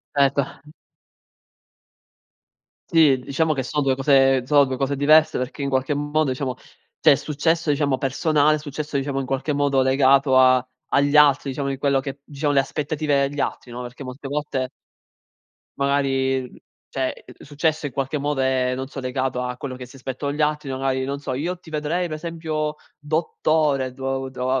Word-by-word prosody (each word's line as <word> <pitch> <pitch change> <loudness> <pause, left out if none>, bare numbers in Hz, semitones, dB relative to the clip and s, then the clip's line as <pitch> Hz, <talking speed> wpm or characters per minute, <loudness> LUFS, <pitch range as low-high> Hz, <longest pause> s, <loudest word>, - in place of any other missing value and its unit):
Erto. 140 -1 +3 2.4
Sì, 155 -5 +5
diciamo 155 +5 0
che 135 - -2
sono 150 +4 -1
2 135 -1 +2
cose 135 -1 +3
sono 145 +1 +5
2 130 -1 -3
cose 135 +1 -1
diverse 155 +3 +5
perché 125 +3 -4
in 140 - -1
qualche 130 +1 0
modo, 145 +1 0
diciamo, 130 -1 -3 0.4
c'è - - +6
il 140 - +4
successo 160 +2 0
diciamo 140 -2 +1
personale, 150 +3 +2
successo, 150 0 -4
diciamo, 135 0 -2
in - - -5
qualche 135 +3 -2
modo 140 -2 +2
legato 135 0 +4
a 130 -1 +5 0.2
agli 145 +1 +2
altri 145 -2 +5
diciamo 140 +1 -3
di 135 - -3
quello 140 -1 +2
che 135 +1 -6
diciamo 145 0 -2
le 140 - +4
aspettative 145 0 0
degli 145 +1 -7
altri, 125 - -3
no, 120 +1 -6
perché 125 +3 -8
molte 135 +2 -8
volte 140 -2 -2 1.1
magari, 135 -2 0 0.4
cioè 130 -1 -3
il - - -14
successo 155 +2 -1
in 140 - -6
qualche 135 +2 -2
modo 145 -1 -1
è, 130 -1 +1
non 130 +1 -4
so, 135 0 -7
legato 130 0 -2
a 125 0 -4
quello 130 -1 -6
che 125 -1 -8
si 125 - -15
aspettano 135 +2 -4
gli 150 +1 -1
altri, 150 -1 -1
magari, 130 0 -1
non 140 +1 -3
so: 140 - -5
"Io 165 +8 -3
ti 175 - -15
vedrei 155 +4 -1
per 155 - -4
esempio 155 -2 -3 0.2
dottore" 150 -3 0
do 135 0 -3
doa 130 0 -1
140 Hz, 175 wpm, -22 LUFS, 130-150 Hz, 2.4 s, c'è